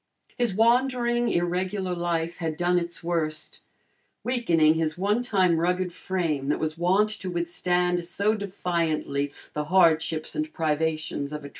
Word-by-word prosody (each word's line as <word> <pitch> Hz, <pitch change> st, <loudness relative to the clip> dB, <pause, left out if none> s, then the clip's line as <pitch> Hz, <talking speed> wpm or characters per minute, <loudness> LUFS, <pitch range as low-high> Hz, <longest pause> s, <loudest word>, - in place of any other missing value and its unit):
His 240 Hz, -6 st, 0 dB
wandering 240 Hz, +1 st, +2 dB
irregular 180 Hz, +2 st, -1 dB
life 170 Hz, -1 st, -2 dB
had 160 Hz, -3 st, -3 dB
done 175 Hz, 0 st, +2 dB
its 170 Hz, 0 st, -6 dB
worst, 160 Hz, -3 st, -2 dB, 0.6 s
weakening 170 Hz, -12 st, +3 dB
his 160 Hz, -1 st, -1 dB
one 205 Hz, +5 st, +1 dB
time 185 Hz, -8 st, +2 dB
rugged 180 Hz, +1 st, 0 dB
frame 165 Hz, -9 st, -2 dB
that -, -, +2 dB
was 155 Hz, 0 st, -2 dB
wont 185 Hz, +5 st, +2 dB
to 190 Hz, -3 st, -5 dB
withstand 175 Hz, 0 st, 0 dB
so 200 Hz, +5 st, 0 dB
defiantly, 170 Hz, -8 st, -1 dB, 0.2 s
the 150 Hz, 0 st, -2 dB
hardships 160 Hz, -2 st, +2 dB
and 310 Hz, 0 st, -2 dB
privations 155 Hz, -, -1 dB
of -, -, -4 dB
a -, -, -4 dB
tramp -, -, -17 dB
life. 140 Hz, -, -8 dB
175 Hz, 150 wpm, -26 LUFS, 160-195 Hz, 0.6 s, weakening